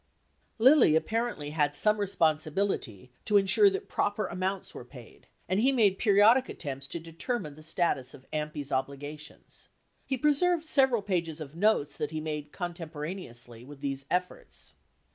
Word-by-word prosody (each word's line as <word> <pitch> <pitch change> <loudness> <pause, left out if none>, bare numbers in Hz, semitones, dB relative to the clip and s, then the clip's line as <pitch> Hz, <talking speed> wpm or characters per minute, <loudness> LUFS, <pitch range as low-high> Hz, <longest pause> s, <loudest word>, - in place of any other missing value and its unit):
Lilly 250 - +6
apparently 220 -4 -1
had 145 -2 +1
some 210 +5 +2
re 200 - 0
sponsibility 155 - -1
to 210 -1 +4
insure 200 - +5
that 395 +1 -4
proper 205 0 -1
amounts 185 +1 -3
were - - -8
paid, 125 -2 -15 0.2
and 185 +2 +1
he 260 +5 +4
made 210 -7 +3
periodic 220 +5 +5
attempts 140 -3 -6
to 170 - -5
determine 165 - -4
the 155 - -14
status 155 -4 -1
of 130 - -17
AMPl's 150 -2 -4
obligations. 140 +3 -6 0.3
He 265 - -2
preserved 310 +5 +2
several 265 -8 +3
pages 170 -5 -2
of 155 -1 -8
notes 185 -6 +1
that 150 - -2
he 155 0 -4
made 150 -1 -5
contemporaneously 155 - -7
with 140 +1 -13
these 135 -1 -4
efforts. 180 0 -4
165 Hz, 150 wpm, -29 LUFS, 145-210 Hz, 0.3 s, Lilly